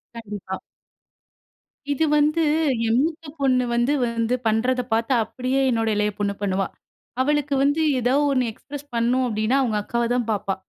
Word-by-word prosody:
கண்டிப்பா. 205 Hz, -4 st, -6 dB, 1.3 s
இது 285 Hz, +3 st, +1 dB
வந்து, 305 Hz, +3 st, +2 dB, 0.5 s
என் 230 Hz, +3 st, +3 dB
மூத்த 325 Hz, +1 st, -3 dB
பொண்ணு 255 Hz, -2 st, +2 dB
வந்து 240 Hz, +4 st, +2 dB
வந்து 230 Hz, +1 st, -1 dB
பண்ணுறத 250 Hz, +4 st, +1 dB
பாத்து, 225 Hz, +3 st, +1 dB
அப்டியே 255 Hz, +4 st, -1 dB
என்னோட 225 Hz, -2 st, 0 dB
இளைய 210 Hz, 0 st, +1 dB
பொண்ணு 200 Hz, -1 st, 0 dB
பண்ணுவா. 195 Hz, -1 st, 0 dB, 0.5 s
அவளுக்கு 295 Hz, 0 st, +1 dB
வந்து 285 Hz, +3 st, +2 dB, 0.2 s
எதோ 245 Hz, +2 st, +1 dB, 0.2 s
ஒண்ணு 255 Hz, -2 st, +2 dB
எக்ஸ்பிரஸ் 285 Hz, +5 st, -10 dB
பண்ணணும் 245 Hz, +2 st, +2 dB
அப்படின்னா, 215 Hz, +3 st, +1 dB
அவுங்க 220 Hz, -5 st, 0 dB
அக்காவை 235 Hz, +1 st, -1 dB
தான் 240 Hz, -2 st, -1 dB
பாப்பா. 200 Hz, -2 st, -1 dB
240 Hz, 145 wpm, -23 LUFS, 220-270 Hz, 1.3 s, என்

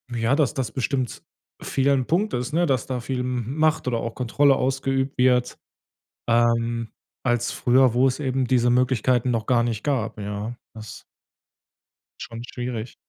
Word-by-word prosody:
ja, 115 Hz, +4 st, +1 dB
dass 145 Hz, -5 st, +1 dB
das 130 Hz, -6 st, -2 dB
bestimmt 130 Hz, -1 st, -2 dB, 0.4 s
vielen 140 Hz, 0 st, +1 dB
'n -, -, -5 dB
Punkt 200 Hz, +6 st, 0 dB
ist, 125 Hz, +4 st, -2 dB
ne, 175 Hz, +2 st, +3 dB
dass 130 Hz, -7 st, 0 dB
da 130 Hz, -2 st, -2 dB
viel 130 Hz, +2 st, -3 dB
M 125 Hz, +2 st, -3 dB
Macht 155 Hz, -2 st, +2 dB
oder 115 Hz, -2 st, 0 dB
auch 115 Hz, -, -5 dB
Kontrolle 135 Hz, +3 st, +3 dB
ausgeübt 135 Hz, +1 st, -1 dB
wird, 125 Hz, -1 st, +2 dB, 0.7 s
ähm, 115 Hz, -1 st, +1 dB, 0.3 s
als 120 Hz, -1 st, +1 dB
früher, 130 Hz, 0 st, +3 dB
wo 125 Hz, +2 st, +4 dB
es 130 Hz, +3 st, 0 dB
eben 130 Hz, -2 st, 0 dB
diese 120 Hz, -1 st, +2 dB
Möglichkeiten 125 Hz, 0 st, +2 dB
noch 115 Hz, -2 st, -1 dB
gar 120 Hz, -2 st, +3 dB
nicht 115 Hz, -3 st, -2 dB
gab, 125 Hz, -7 st, -1 dB
ja. 105 Hz, +3 st, -5 dB, 0.2 s
Das 110 Hz, -1 st, -10 dB, 1.2 s
ist -, -, -5 dB
schon 115 Hz, 0 st, -8 dB
schwierig. 120 Hz, -2 st, -5 dB
125 Hz, 165 wpm, -23 LUFS, 115-135 Hz, 1.2 s, wo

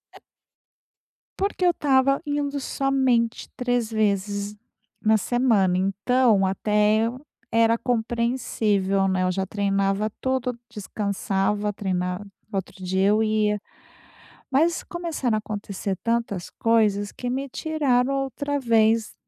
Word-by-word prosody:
E -, -, -13 dB, 1.2 s
Porque 390 Hz, -1 st, -1 dB
eu -, -, +6 dB
estava 275 Hz, -3 st, +2 dB
indo 290 Hz, -1 st, -1 dB
somente 260 Hz, -4 st, 0 dB
3 245 Hz, -2 st, -1 dB
vezes 205 Hz, -1 st, -1 dB, 0.4 s
na 220 Hz, 0 st, +3 dB
semana, 215 Hz, -7 st, +2 dB
então 205 Hz, +3 st, +2 dB
até 210 Hz, +3 st, +2 dB
eu 250 Hz, +3 st, -4 dB, 0.3 s
era 230 Hz, 0 st, +4 dB
compreensível, 225 Hz, -5 st, 0 dB
né. 185 Hz, -1 st, +1 dB
Eu 185 Hz, -, +1 dB
já 190 Hz, +1 st, -1 dB
treinava 200 Hz, +1 st, 0 dB
tudo, 255 Hz, -2 st, -1 dB
descansava, 205 Hz, 0 st, -1 dB
treinava. 185 Hz, -1 st, -2 dB, 0.3 s
Outro 190 Hz, -1 st, -5 dB
dia 190 Hz, +2 st, +2 dB
eu 215 Hz, +1 st, +3 dB
ia, 215 Hz, -1 st, +1 dB, 0.9 s
mas 320 Hz, +5 st, +2 dB
começaram 330 Hz, -9 st, -2 dB
a -, -, +1 dB
acontecer 205 Hz, -2 st, -4 dB
tantas 230 Hz, -6 st, -1 dB
coisas 210 Hz, -3 st, +1 dB
que 245 Hz, -, -6 dB
me 270 Hz, +2 st, -2 dB
tiraram 275 Hz, -3 st, 0 dB
outra 280 Hz, +1 st, -2 dB
vez 225 Hz, -2 st, +2 dB
220 Hz, 115 wpm, -24 LUFS, 200-255 Hz, 1.2 s, eu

